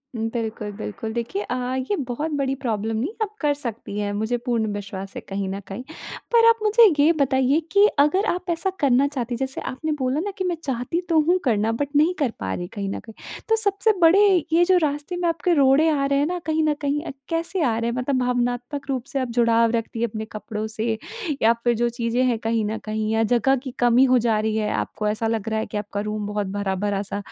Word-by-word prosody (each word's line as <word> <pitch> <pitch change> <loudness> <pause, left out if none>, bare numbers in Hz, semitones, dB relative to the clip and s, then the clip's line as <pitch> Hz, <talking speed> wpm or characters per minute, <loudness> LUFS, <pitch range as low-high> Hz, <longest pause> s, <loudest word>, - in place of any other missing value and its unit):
बिल्कुल, 225 -2 -3
बिल्कुल। 220 +1 -5
देखिए 235 - -3
अ, 250 - -3 0.2
ये 260 +10 -1
बहुत 295 +6 -3
बड़ी 270 -1 0
प्रॉब्लम 225 -3 -1
नहीं, 250 +9 -1
आप 425 0 -6
कर 295 -2 +2
सकती 235 -7 -6
हैं, 205 -1 -1
मुझे 220 +4 -1
पूर्ण 235 -3 +1
विश्वास 195 -1 -6
है - - -5
कहीं 195 0 -2
न 195 +1 -4
कहीं। 200 +6 -6 0.5
पर 460 -1 +6
आप 460 0 +3
मुझे 435 +2 +5 0.2
ये 300 +3 +6
बताइए 265 +1 +3
कि 400 +1 +6
अगर 370 +8 +3
आप 360 +1 -5
ऐसा 340 +3 0
करना 275 0 +3
चाहती 250 -4 -3
हैं, - - -5
जैसे 265 0 -2
आपने 310 +5 -4
बोला 260 +2 0
ना 405 +5 -2
कि, 380 - -1
"मैं 360 -2 0
चाहती 265 +5 -2
तो 325 -2 +4
हूँ 360 +2 +4
करना, 225 -3 +1
बट 285 +5 -1
नहीं 310 +5 +4
कर 275 -6 +1
पा 95 0 -3
रही 175 - -4
कहीं 200 -2 -3
न - - -4
कहीं।" 225 - -13 0.4
तो 445 - +5
सबसे 440 0 +2
बड़े 340 +5 +6 0.3
ये 340 +1 +5
जो 370 0 +4
रास्ते 295 +3 -2
में 350 -1 0
आपके 335 +2 +1
रोड़े 280 +1 +4
आ 285 -3 +1
रहे 275 0 +2
हैं 285 - +2
ना, 360 +1 -2
कहीं 315 0 +1
न 305 -1 +2
कहीं 290 +1 0
अ, - - -5 0.2
कैसे 335 +3 -1
आ 230 -5 +1
रहे 230 +1 -1
हैं? 240 - -4
मतलब 255 +2 0
भावनात्मक 245 +2 -1
रूप 260 -3 -1
से 275 - +1
आप 260 - -1
जुड़ाव 230 -1 +4
रखती 230 0 -3
हैं 235 - +2
अपने 220 0 -5
कपड़ों 215 0 -5
से, 220 +1 -2 0.4
या 225 +1 +5
फिर 240 -1 +2
जो 240 +1 +1
चीज़ें 235 +1 -1
हैं 240 -3 +1
कहीं 225 -1 0
न 215 +1 -2
कहीं, 215 0 -2
या 225 0 +2
जगह 265 +3 +3
की 260 - -5
कमी 245 +1 +5
हो 255 - +5
जा 220 -2 +2
रही 215 0 -1
है? 210 -1 0
आपको 210 - -2
ऐसा 215 +2 -1
लग 225 -1 -2
रहा 220 0 0
है 220 - -2
कि 210 - -5
आपका 205 0 -4
रूम 210 -1 -3
बहुत 205 -1 -2
भरा-भरा 200 0 -1
सा - - -2
245 Hz, 240 wpm, -23 LUFS, 220-295 Hz, 0.5 s, पर